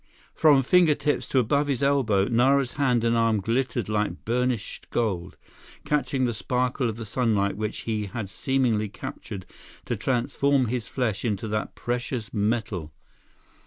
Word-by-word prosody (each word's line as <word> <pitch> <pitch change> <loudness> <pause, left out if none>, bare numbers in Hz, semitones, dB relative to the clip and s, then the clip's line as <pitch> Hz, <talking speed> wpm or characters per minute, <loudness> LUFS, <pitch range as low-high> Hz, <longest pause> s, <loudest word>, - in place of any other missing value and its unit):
From 145 -4 +5
fingertips 150 -2 +3
to - - -1
above 140 +4 +2
his 140 -1 -1
elbow, 125 -9 +3
Nara's 125 +3 +3
hand 125 -5 +1
and 115 0 +2
arm 115 -2 +2
glittered 120 +2 -1
like 105 -1 -2
burnished 125 -1 -2
gold, 95 -6 -2 0.5
catching 135 -3 +1
the 120 - 0
sparkle 125 +2 0
of 110 - -5
the 115 - -6
sunlight 105 -3 +1
which 105 0 -3
he 110 -2 -2
had 105 +1 -5
seemingly 115 -1 0
captured 105 -3 -7 0.4
to - - -1
transform 130 +2 +1
his 120 -3 -2
flesh 120 -6 -2
into 110 -1 -1
that 105 0 -3
precious 120 -1 -3
metal. 105 -6 -1
120 Hz, 145 wpm, -26 LUFS, 105-130 Hz, 0.5 s, From